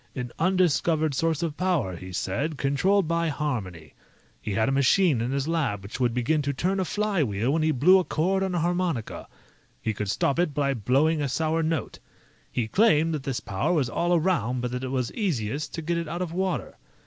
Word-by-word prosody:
An 125 -2 -4
undiscovered 165 -3 +2
source 160 +3 0
of 160 -3 -2
power, 170 - 0
he 90 +2 -9
said, 140 - -2
controlled 160 +8 +2
by 170 0 0
harmony. 105 - -4 0.5
He 105 - -3
had 110 +4 +1
a - - +1
machine 140 +1 +3
in 120 - -1
his 140 +1 -1
lab 140 -12 -1
which 100 +6 -7
would 125 -2 +2
begin 125 +6 +1
to 140 0 -2
turn 185 +8 -1
a 190 - 0
flywheel 145 - 0
when 160 - +1
he 155 - +2
blew 155 +7 +5
a - - 0
chord 185 +4 0
on 190 -2 -1
a - - +1
harmonica. 175 -8 -2 0.5
He 110 - -2
could 105 -1 -4
stop 140 - 0
it 165 -5 0
by 140 -1 +1
blowing 140 +7 +2
a 140 - -1
sour 160 +4 0
note. 160 -4 -2 0.5
He 115 -3 -1
claimed 165 - +3
that 150 - -2
this 130 -2 -3
power 95 - -1
was 135 -8 +1
all 175 +5 +1
around, 155 -8 0
but 125 0 -3
that 125 +1 -4
it - - -2
was 130 -2 -2
easiest 145 - -2
to 165 - -5
get 170 +2 -1
it 165 - -4
out 170 +3 -3
of 170 -2 -6
water. 185 0 -2
150 Hz, 210 wpm, -26 LUFS, 125-170 Hz, 0.5 s, blew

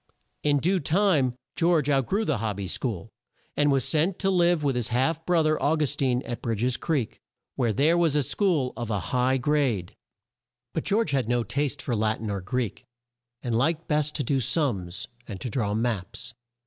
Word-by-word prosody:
In 145 -1 +3
due 180 +6 +2
time 155 -6 +2 0.2
George 165 -4 +2
out 135 -4 +2
grew 215 +3 0
the 145 - 0
Hob 105 -3 -2
by 100 - -3
School, 100 -1 -3 0.4
and 145 0 +3
was 135 -2 +2
sent 165 +4 +1
to 195 -1 +1
live 175 -3 +3
with 140 -3 +1
his 120 -3 0
half 135 +7 0
bro 175 -2 +3
ther 155 0 +1
Au 155 +3 +3
gus 150 -2 0
tine, 130 -2 +1
at 120 - -5
Bridg 115 -2 -2
es 125 0 +2
Creek, 145 -9 -2 0.4
where 120 -4 +1
there 145 +9 +3
was 170 -4 +2
a 145 - +3
school 155 -8 +1
of 120 -2 -5
a 105 -3 0
high 125 +1 +3
grade. 130 -9 0 0.8
But - - -2
George 205 -5 +1
had 130 -5 0
no 120 -1 +2
taste 135 +5 -2
for 120 - -1
Lat 110 0 0
in 110 -2 -3
or 100 -1 -3
Greek, 115 +3 -3 0.6
and 120 -2 -1
liked 155 +7 +1
best 150 -1 0
to 145 - 0
do 135 +2 +1
sums, 105 - -1 0.2
and 100 -4 -6
to 125 - -5
draw 105 -4 -1
maps. 110 -2 -3
135 Hz, 200 wpm, -26 LUFS, 115-155 Hz, 0.8 s, In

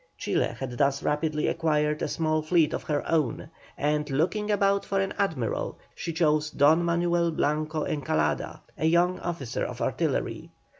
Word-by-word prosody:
Chile - - 0
had 125 -2 -5
thus 140 0 +2
rapidly 150 0 0
acquired 150 -2 +1
a - - 0
small 155 -1 0
fleet 155 -1 +2
of - - -2
her 145 -2 -1
own, 155 -8 0 0.3
and, 150 0 0
looking 180 +10 0
about 200 -1 +2
for 195 - -1
an 195 0 -1
admiral, 155 - -1 0.2
she 170 - -4
chose 155 -2 +2
Don 155 +4 +4
Manuel 170 0 +1
Blanco 155 0 -1
Encalada, 80 - -1 0.2
a - - 0
young 175 +2 +3
officer 155 -9 -3
of - - -5
artillery. - - -1
155 Hz, 155 wpm, -27 LUFS, 150-170 Hz, 0.3 s, Don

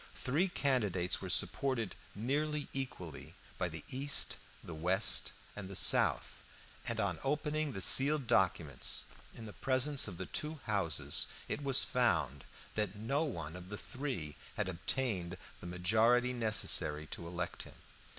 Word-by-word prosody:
Three 150 +9 +1
candidates 105 - 0
were 95 - -5
supported 115 +3 0 0.2
nearly 145 +7 -1
equally 90 - -5 0.2
by 90 - 0
the 80 -2 -8
East, 140 +2 +3 0.3
the 85 - -8
West, 90 +4 +2 0.2
and 100 -3 -7
the 100 - -8
South, - - +2 0.4
and - - -1
on - - -1
opening 150 +1 -1
the 95 - -4
sealed 140 +6 +5
documents 90 -9 +1 0.3
in 115 - -8
the 105 - -9
presence 135 +1 +2
of 95 -5 -7
the 95 - -4
two 155 - -4
houses, 95 -7 +2 0.2
it - - -3
was 135 -2 +3
found 80 - 0 0.3
that 105 -2 -2
no 130 +9 0
one 85 - -5
of 90 0 -9
the 105 - -5
three 130 - -5 0.2
had 105 - -1
obtained 95 -1 -1 0.2
the - - -9
majority 110 +8 +3
necessary 105 -9 +2
to 85 +2 -7
elect 90 0 -4
him. - - -11
110 Hz, 145 wpm, -34 LUFS, 90-135 Hz, 0.4 s, sealed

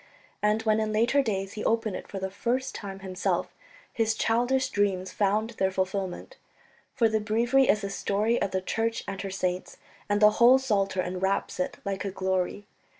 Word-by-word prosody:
And 210 +1 +2
when 215 -1 +2
in 215 0 -1
later 235 +6 +3
days 195 -5 -2
he 215 - -5
opened 225 -3 0
it - - -7
for 200 - -7
the 190 0 -3
first 245 +6 -1
time 195 -2 -7
himself 185 -1 -2 0.4
his 225 -1 +1
childish 245 +4 +1
dreams 195 -4 0
found 210 +3 +1
their 190 -4 0
fulfilment. 190 - -3 0.6
For 235 -4 +4
the 220 0 +1
Breviary 235 +5 +2
is 210 - +4
the 200 -1 -4
story 210 +4 0
of 200 - +1
the 190 0 -1
Church 225 +4 -1
and 195 -1 -4
her 195 - -4
saints, 185 -1 -3 0.3
and 205 0 +2
the 210 0 +7
whole 250 +2 +8
Psalter 195 -7 0
enwraps 185 +2 -2
it 180 - -2
like 200 -1 -2
a 200 - -2
glory. 190 +1 -2
205 Hz, 185 wpm, -27 LUFS, 190-225 Hz, 0.6 s, whole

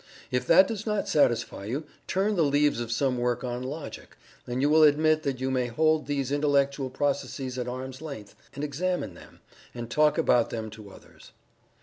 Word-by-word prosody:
If 125 - -1
that 190 +3 +7
does 220 -1 -5
not 210 -1 -1
satisfy 120 -8 +1
you, 130 +9 -3 0.2
turn 200 +3 +1
the 175 - +2
leaves 145 -3 +2
of 120 -1 -4
some 125 +1 0
work 120 0 -1
on 125 0 -3
Logic, 145 +5 -7 0.3
and 125 +1 -2
you 140 - +3
will 155 +1 +5
admit 155 +1 +4
that 135 -4 -2
you 130 0 -1
may 125 -1 0
hold 155 +5 +1
these 140 -2 -2
intellectual 140 -2 +1
processes 135 -1 -2
at 125 - -3
arm's 130 +2 -6
length 140 -10 -8 0.2
and 140 - -5
examine 175 +5 -2
them, - - -16 0.3
and 120 -1 -6
talk 150 +3 +3
about 125 -7 +3
them 110 -2 -5
to 105 -1 -11
others. - - -16
140 Hz, 190 wpm, -27 LUFS, 125-155 Hz, 0.3 s, that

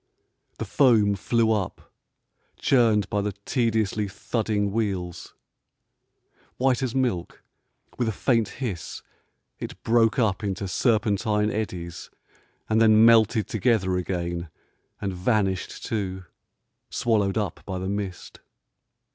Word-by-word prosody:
The - - -4
foam 110 -7 +4
flew 110 +3 +1
up, 100 -5 -3 0.6
churned 115 -6 +3
by 105 - +1
the 105 0 -2
tediously 110 -4 0
thudding 105 0 -1
wheels; 95 -5 -3 1.2
white 130 0 +2
as 130 -2 -2
milk, 120 -10 -1 0.6
with 120 - +1
a - - +1
faint 115 0 +1
hiss 105 - -5 0.6
it - - -7
broke 115 -1 +3
up 105 -4 +1
into 100 -1 -2
serpentine 105 -1 +1
eddies, 90 -6 -5 0.6
and 110 +1 +2
then 110 0 +6
melted 110 -2 +5
together 110 -5 +1
again 85 -2 -3 0.5
and 100 -1 -3
vanished 95 0 -1
too, 95 -4 -3 0.7
swallowed 105 -4 +1
up 105 -6 -2
by 95 -2 -3
the 95 +1 -4
mist. 100 -2 -5
105 Hz, 115 wpm, -25 LUFS, 95-115 Hz, 1.2 s, then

